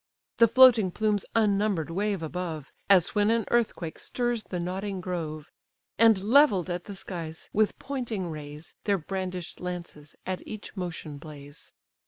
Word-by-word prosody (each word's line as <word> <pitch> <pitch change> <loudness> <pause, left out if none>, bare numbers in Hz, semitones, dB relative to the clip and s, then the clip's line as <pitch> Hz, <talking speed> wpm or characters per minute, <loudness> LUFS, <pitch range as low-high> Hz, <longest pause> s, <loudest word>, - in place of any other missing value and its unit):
The 230 - +8
floating 230 -4 +7
plumes 210 +1 0
unnumber'd 200 -6 +2
wave 200 0 -1
above, 160 -3 -5 0.2
As 185 -4 +5
when 210 0 +3
an 230 -2 +2
earthquake 215 -8 0
stirs 240 -4 -1
the 180 -1 -4
nodding 190 +3 -3
grove; 160 -4 -5 0.5
And 225 -4 +5
levell'd 210 - +4
at 175 0 -4
the 200 - -7
skies 165 -4 -7
with 215 0 +2
pointing 235 -10 -4
rays, 150 0 -9
Their 200 -1 +3
brandish'd 185 0 -5
lances 175 -4 -7
at 185 -1 -3
each 215 -1 -8
motion 165 -5 -5
blaze. 145 -2 -11
185 Hz, 145 wpm, -27 LUFS, 165-215 Hz, 0.5 s, The